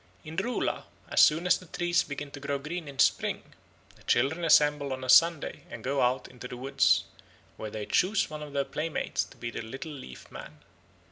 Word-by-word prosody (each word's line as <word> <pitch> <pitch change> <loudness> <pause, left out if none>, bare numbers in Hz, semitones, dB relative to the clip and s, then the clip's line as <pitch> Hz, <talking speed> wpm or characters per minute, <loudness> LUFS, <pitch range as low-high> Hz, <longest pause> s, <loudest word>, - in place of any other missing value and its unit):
In 155 +1 -8
Ruhla 245 +8 -1 0.2
as - - +4
soon 160 +3 +5
as 180 - +4
the 180 - -14
trees 175 +1 +1
begin 145 0 -6
to 145 - -8
grow 140 0 -2
green 155 +3 -6
in 140 -1 -9
spring, - - +1 0.4
the - - -22
children 140 +8 +1
assemble 150 -3 +4
on 130 0 -6
a 130 - -5
Sunday 165 0 +5
and 120 -1 -8
go 135 +2 0
out 125 +1 +1
into 125 0 -10
the 125 - -8
woods, 135 +2 +3 0.5
where 110 - -6
they 105 0 -5
choose 195 - +2
one 155 0 -7
of 150 -1 -7
their 140 -1 0
playmates 155 +1 -2
to - - -18
be 120 -1 -5
the - - -5
Little 135 +8 -7
Leaf 130 - -11
Man. - - -10
145 Hz, 205 wpm, -29 LUFS, 130-160 Hz, 0.5 s, soon